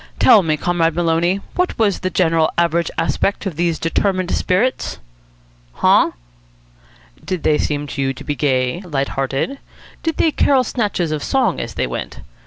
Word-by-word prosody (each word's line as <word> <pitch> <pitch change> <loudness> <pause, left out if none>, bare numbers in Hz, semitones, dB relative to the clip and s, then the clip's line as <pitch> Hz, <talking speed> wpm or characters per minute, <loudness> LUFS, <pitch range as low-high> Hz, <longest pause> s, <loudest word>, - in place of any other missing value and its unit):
"Tell 215 - +6
me, 155 -3 0
Comrade 165 -1 0
Maloney, 175 +3 +1
what 360 0 -1
was 210 -4 +1
the 185 - -2
general 165 -2 +2
average 170 0 +1
aspect 165 +6 0
of 190 -5 -3
these 170 0 0
determined 185 +2 0
spirits?" 215 +8 0 0.8
"Huh?" - - +3 1.1
"Did 185 -4 -4
they 150 - +2
seem 145 -1 -1
to 140 - -5
you 135 0 +1
to 135 - -9
be 145 - -2
gay, 130 +1 0
lighthearted? 140 - -2 0.4
Did 325 -2 -2
they 320 - +3
carol 270 -3 +3
snatches 205 -9 -1
of 150 -2 -2
song - - +1
as - - -5
they - - 0
went? - - -6
170 Hz, 160 wpm, -19 LUFS, 150-190 Hz, 1.1 s, Tell